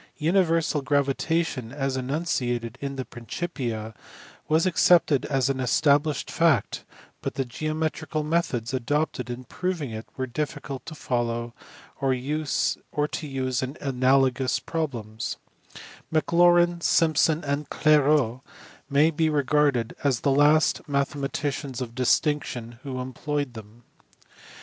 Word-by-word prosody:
Universal 165 Hz, -2 st, +2 dB
gravitation 140 Hz, -1 st, 0 dB
as 135 Hz, -1 st, -2 dB
enunciated 125 Hz, -4 st, -2 dB
in 140 Hz, -1 st, -4 dB
the 130 Hz, -1 st, -4 dB
Principia 120 Hz, -4 st, -5 dB, 0.5 s
was 160 Hz, +3 st, +3 dB
accepted 170 Hz, -5 st, +4 dB
as 135 Hz, -3 st, +1 dB
an 135 Hz, -1 st, -1 dB
established 145 Hz, +3 st, +2 dB
fact, 160 Hz, -10 st, +2 dB, 0.4 s
but -, -, -4 dB
the 135 Hz, -, -1 dB
geometrical 155 Hz, +3 st, -2 dB
methods 150 Hz, -7 st, -1 dB
adopted 130 Hz, 0 st, -1 dB
in 125 Hz, +1 st, -5 dB
proving 170 Hz, -1 st, -3 dB
it 110 Hz, 0 st, -7 dB
were 130 Hz, -, -1 dB
diffi 145 Hz, +3 st, -3 dB
cult 135 Hz, -2 st, -7 dB
to 160 Hz, -, -7 dB
follow 120 Hz, -3 st, -2 dB, 0.5 s
or 135 Hz, -1 st, +2 dB
to -, -, -3 dB
use 145 Hz, -1 st, -2 dB
in 130 Hz, +3 st, -4 dB
analogous 130 Hz, -1 st, +2 dB
problems; 120 Hz, -10 st, -4 dB, 0.7 s
Maclaurin, 175 Hz, +2 st, +4 dB
Simpson, 160 Hz, -1 st, +3 dB
and 145 Hz, +1 st, -2 dB
Clairaut 145 Hz, -5 st, +3 dB, 0.5 s
may 150 Hz, +3 st, +4 dB
be 160 Hz, 0 st, +1 dB
regarded 145 Hz, -4 st, +1 dB
as 135 Hz, -5 st, +1 dB
the 140 Hz, -, +2 dB
last 145 Hz, +3 st, +4 dB
mathe 140 Hz, 0 st, 0 dB
EULER. 140 Hz, -2 st, -2 dB
399 -, -, -18 dB, 0.4 s
maticians 125 Hz, -, -6 dB
of 120 Hz, -3 st, -5 dB
distinction 125 Hz, -2 st, 0 dB
who 130 Hz, -3 st, -5 dB
employed 140 Hz, +1 st, -3 dB
them. 110 Hz, +1 st, -12 dB
140 Hz, 125 wpm, -25 LUFS, 125-155 Hz, 0.7 s, accepted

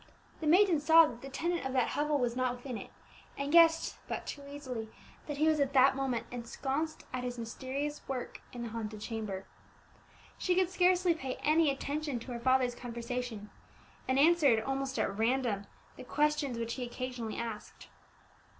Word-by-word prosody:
The 315 Hz, -, -3 dB
maiden 360 Hz, 0 st, +5 dB
saw 320 Hz, +2 st, +7 dB
that 240 Hz, -5 st, -7 dB
the 275 Hz, -, -7 dB
tenant 340 Hz, +5 st, -1 dB
of 265 Hz, 0 st, -3 dB
that 255 Hz, -2 st, +2 dB
hovel 295 Hz, 0 st, +1 dB
was 245 Hz, -3 st, 0 dB
not 255 Hz, -1 st, 0 dB
within 245 Hz, 0 st, -7 dB
it, -, -, -7 dB, 0.5 s
and 280 Hz, +1 st, -2 dB
guessed 330 Hz, 0 st, +5 dB
but -, -, -4 dB
too 285 Hz, -, -6 dB
easily 255 Hz, -6 st, -6 dB, 0.4 s
that 295 Hz, -2 st, -4 dB
he 310 Hz, +2 st, +3 dB
was 310 Hz, -1 st, +3 dB
at 280 Hz, -1 st, +1 dB
that 265 Hz, 0 st, +6 dB
moment 265 Hz, -4 st, -1 dB
ensconced 270 Hz, +6 st, -3 dB
at 255 Hz, -1 st, -2 dB
his 245 Hz, -1 st, -4 dB
mysterious 265 Hz, +5 st, -4 dB
work 260 Hz, -2 st, -5 dB
in 240 Hz, -1 st, -6 dB
the 235 Hz, -, -4 dB
haunted 215 Hz, -1 st, -5 dB
chamber. 210 Hz, -3 st, -4 dB, 0.9 s
She 360 Hz, -, +1 dB
could 370 Hz, -1 st, +2 dB
scarcely 365 Hz, -1 st, +4 dB
pay 265 Hz, -5 st, -4 dB
any 310 Hz, 0 st, +4 dB
attention 285 Hz, 0 st, -2 dB
to 250 Hz, -, -8 dB
her 240 Hz, -, -4 dB
father's 255 Hz, 0 st, +3 dB
conversation, 235 Hz, -3 st, -5 dB, 0.6 s
and 260 Hz, -, +2 dB
answered 290 Hz, -6 st, +5 dB
almost 270 Hz, 0 st, -2 dB
at 195 Hz, -, 0 dB
random 225 Hz, -3 st, 0 dB, 0.3 s
the -, -, -8 dB
questions 295 Hz, -2 st, 0 dB
which 230 Hz, 0 st, -2 dB
he 255 Hz, -, -4 dB
occasionally 245 Hz, -2 st, -5 dB
asked. 225 Hz, -2 st, -6 dB
265 Hz, 175 wpm, -32 LUFS, 240-300 Hz, 0.9 s, saw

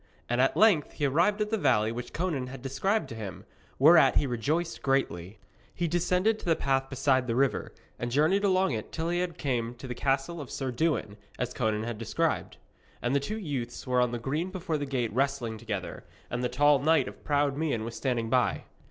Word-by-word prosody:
And 120 Hz, +1 st, +1 dB
at 135 Hz, -, +2 dB
length 200 Hz, -9 st, +4 dB
he 145 Hz, -, -1 dB
arrived 170 Hz, +10 st, +2 dB
at 210 Hz, 0 st, -1 dB
the 220 Hz, -, +1 dB
valley 115 Hz, -, +3 dB
which 120 Hz, +1 st, -6 dB
Conan 155 Hz, -7 st, -2 dB
had 130 Hz, 0 st, -9 dB
described 190 Hz, +11 st, 0 dB
to 115 Hz, -, -7 dB
him, 105 Hz, -5 st, -7 dB, 0.3 s
whereat 160 Hz, +4 st, +6 dB
he -, -, +3 dB
rejoiced 150 Hz, +8 st, -1 dB
greatly. 105 Hz, -8 st, -1 dB, 0.4 s
He 175 Hz, -, 0 dB
descended 180 Hz, +6 st, +1 dB
to -, -, -11 dB
the 165 Hz, -2 st, +3 dB
path 135 Hz, -2 st, 0 dB
beside 130 Hz, -1 st, +1 dB
the 115 Hz, -, 0 dB
river, 135 Hz, +1 st, +1 dB, 0.3 s
and 120 Hz, -, -2 dB
journeyed 155 Hz, +10 st, +2 dB
along 190 Hz, -2 st, +3 dB
it 110 Hz, -3 st, -4 dB
till 165 Hz, +1 st, -2 dB
he 175 Hz, +1 st, +1 dB
came 125 Hz, -8 st, -3 dB
to 130 Hz, -, -9 dB
the 125 Hz, -, -3 dB
castle 135 Hz, +6 st, -1 dB
of 140 Hz, -, -8 dB
Sir 135 Hz, -2 st, -3 dB
Dewin, 120 Hz, -6 st, -1 dB, 0.2 s
as 125 Hz, -1 st, -3 dB
Conan 110 Hz, -2 st, 0 dB
had 115 Hz, -2 st, -4 dB
described. 115 Hz, -, -1 dB, 0.4 s
And 120 Hz, +3 st, 0 dB
the -, -, +4 dB
two 210 Hz, +11 st, -4 dB
youths 140 Hz, -, -4 dB
were 125 Hz, -1 st, +2 dB
on 125 Hz, -1 st, +1 dB
the 120 Hz, -, -2 dB
green 150 Hz, +9 st, -2 dB
before 175 Hz, -4 st, -3 dB
the 145 Hz, -, -3 dB
gate 125 Hz, -5 st, -1 dB
wrestling 125 Hz, -4 st, -1 dB
together, 105 Hz, -4 st, -5 dB, 0.3 s
and 120 Hz, +1 st, -2 dB
the 125 Hz, -, +1 dB
tall 145 Hz, +3 st, +4 dB
knight 155 Hz, 0 st, +3 dB
of -, -, -10 dB
proud 145 Hz, -1 st, +1 dB
mien 145 Hz, -7 st, -1 dB
was 115 Hz, 0 st, -6 dB
standing 120 Hz, -4 st, -1 dB
by. 125 Hz, +2 st, +1 dB
135 Hz, 210 wpm, -28 LUFS, 120-160 Hz, 0.4 s, whereat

